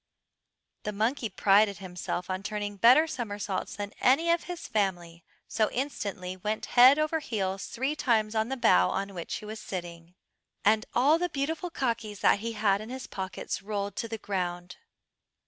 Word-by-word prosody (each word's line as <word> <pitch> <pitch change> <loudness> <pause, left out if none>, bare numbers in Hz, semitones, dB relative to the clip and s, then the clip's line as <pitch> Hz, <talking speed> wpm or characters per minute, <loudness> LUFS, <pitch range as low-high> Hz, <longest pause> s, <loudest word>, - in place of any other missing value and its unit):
The 210 - -3
monkey 225 +3 0
prided 200 +1 +3
himself 180 -1 -5
on 185 0 -3
turning 205 0 -4
better 250 +9 +7
somersaults 205 -9 -4
than 205 0 -5
any 320 +7 +4
of 340 - +1
his 355 -1 -6
family, 175 -5 -2 0.2
so 220 -1 +1
he - - -9
instantly 200 -9 -4
went 210 +3 -3
head 255 +3 +8
over 310 +1 +1
heels 195 -8 -3
three 265 +5 -2
times 220 -6 +1
on 220 +1 0
the 270 - -2
bough 90 - +4
on 195 - -3
which 175 -3 -5
he 215 - -7
was 215 +1 -7
sitting, 170 -1 -7 0.5
and 215 +2 +3
all 295 +6 +4
the 355 0 0
beautiful 320 +5 -2
kakis 230 -8 -3
that - - +4
he 230 +2 -4
had 205 -2 +1
in 215 - -8
his 260 +1 -6
pockets 190 -1 -5
rolled 200 -1 -3
to 230 - -2
the 225 0 -5
ground. 180 -4 -4
215 Hz, 175 wpm, -28 LUFS, 195-250 Hz, 0.5 s, head